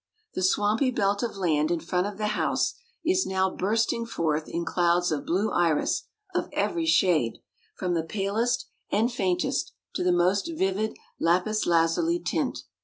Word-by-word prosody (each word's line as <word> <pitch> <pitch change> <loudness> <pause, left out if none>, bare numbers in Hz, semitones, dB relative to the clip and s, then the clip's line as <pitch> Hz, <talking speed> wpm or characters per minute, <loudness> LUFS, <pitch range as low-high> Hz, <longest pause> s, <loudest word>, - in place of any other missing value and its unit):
The - - -3
swampy 210 +7 +2
belt 200 -4 +1
of 230 -4 -3
land 155 -5 +1
in 170 -1 +1
front 180 +3 -1
of 205 -1 -7
the 210 0 -1
house 210 - 0 0.3
is 370 +3 +2
now 190 0 +1
bursting 225 +3 0
forth 160 -7 -1
in 170 0 -3
clouds 175 +1 +2
of 145 -2 -2
blue 195 +6 +1
iris 170 -3 +1 0.3
of - - -1
every 335 -2 0
shade, 170 - +3 0.4
from 180 -2 -2
the 165 - +1
palest 215 +7 -1 0.3
and 225 +4 +2
faintest 185 -6 0 0.2
to - - -1
the 180 - +3
most 180 - +2
vivid 195 +1 0 0.2
lapis 185 +6 +1
lazuli 170 - +2
tint. - - -2
190 Hz, 160 wpm, -26 LUFS, 170-220 Hz, 0.4 s, shade